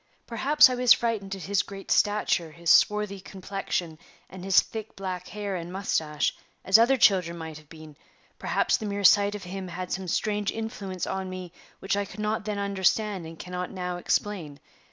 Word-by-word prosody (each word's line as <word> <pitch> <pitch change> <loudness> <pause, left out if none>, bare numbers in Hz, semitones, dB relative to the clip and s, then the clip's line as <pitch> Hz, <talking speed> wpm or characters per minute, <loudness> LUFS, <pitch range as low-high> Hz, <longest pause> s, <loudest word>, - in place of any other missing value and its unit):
Perhaps 275 +6 +5
I 255 - -2
was 250 -1 +6
frightened 210 -4 -2
at 190 - -9
his 200 0 +1
great 195 0 -9
stature, 205 -5 +2
his 170 +2 0
swarthy 210 0 +3
complexion, 185 -4 -4 0.3
and 185 0 -9
his 190 -1 +5
thick 220 -1 -5
black 185 -2 -5
hair 205 -2 -4
and 175 0 -6
mustache, 160 -6 -1 0.3
as 195 +4 +6
other 255 +4 +4
children 180 -7 +3
might 160 -2 -7
have 150 -1 -21
been; 155 -2 -12 0.4
perhaps - - +1
the 215 - -5
mere 200 0 -3
sight 205 +2 +5
of 205 - -7
him 185 +1 -6
had 180 +1 -6
some 190 0 -3
strange 205 +3 0
influence 205 -5 -5
on 190 -1 -3
me 185 -2 -7 0.3
which 195 +1 -1
I 200 0 -1
could 195 +1 -12
not 215 0 -1
then 210 -1 -3
understand 200 -1 0
and 165 0 -10
cannot 180 +1 -5
now 180 -2 -4
explain. 175 -5 -2
195 Hz, 185 wpm, -27 LUFS, 180-210 Hz, 0.4 s, was